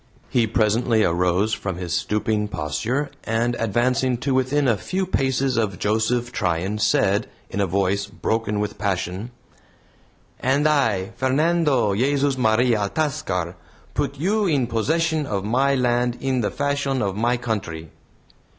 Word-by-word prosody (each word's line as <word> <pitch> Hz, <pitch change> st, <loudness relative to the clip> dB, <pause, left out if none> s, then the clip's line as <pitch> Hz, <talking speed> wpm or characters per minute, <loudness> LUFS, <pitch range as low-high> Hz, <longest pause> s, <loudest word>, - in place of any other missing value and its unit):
He 120 Hz, -2 st, +2 dB
presently 110 Hz, 0 st, +2 dB
arose 90 Hz, +5 st, +1 dB
from 95 Hz, -3 st, -3 dB
his 90 Hz, -2 st, -4 dB
stooping 105 Hz, 0 st, 0 dB
posture, 105 Hz, -, -2 dB
and 115 Hz, +2 st, 0 dB
advancing 120 Hz, +3 st, +1 dB
to 135 Hz, -, 0 dB
within 130 Hz, +2 st, +2 dB
a 115 Hz, -, +4 dB
few 185 Hz, -, -2 dB
paces 135 Hz, -6 st, 0 dB
of 105 Hz, -5 st, 0 dB
Joseph 115 Hz, +3 st, 0 dB
Tryan, 95 Hz, 0 st, -1 dB
said, 100 Hz, -1 st, +2 dB, 0.2 s
in 100 Hz, -, -1 dB
a 100 Hz, -, +1 dB
voice 100 Hz, +2 st, 0 dB
broken 110 Hz, 0 st, -2 dB
with 105 Hz, -1 st, -3 dB
passion: 95 Hz, +1 st, -2 dB, 1.1 s
"And 140 Hz, +4 st, +2 dB
I, 115 Hz, -10 st, +1 dB
Fernando 135 Hz, -4 st, +2 dB
Jesus 140 Hz, +5 st, +1 dB
Maria 120 Hz, -1 st, +2 dB
Altascar, 100 Hz, -, -1 dB, 0.4 s
put 140 Hz, -, -2 dB
you 200 Hz, +7 st, +1 dB
in 140 Hz, -7 st, +2 dB
possession 155 Hz, +6 st, 0 dB
of 100 Hz, -3 st, -2 dB
my 135 Hz, +5 st, +2 dB
land 120 Hz, -1 st, +1 dB
in 130 Hz, -2 st, 0 dB
the 105 Hz, -, 0 dB
fashion 140 Hz, -2 st, -1 dB
of 100 Hz, -2 st, -1 dB
my 120 Hz, +3 st, +1 dB
country." 95 Hz, -, -4 dB
115 Hz, 140 wpm, -23 LUFS, 100-135 Hz, 1.1 s, a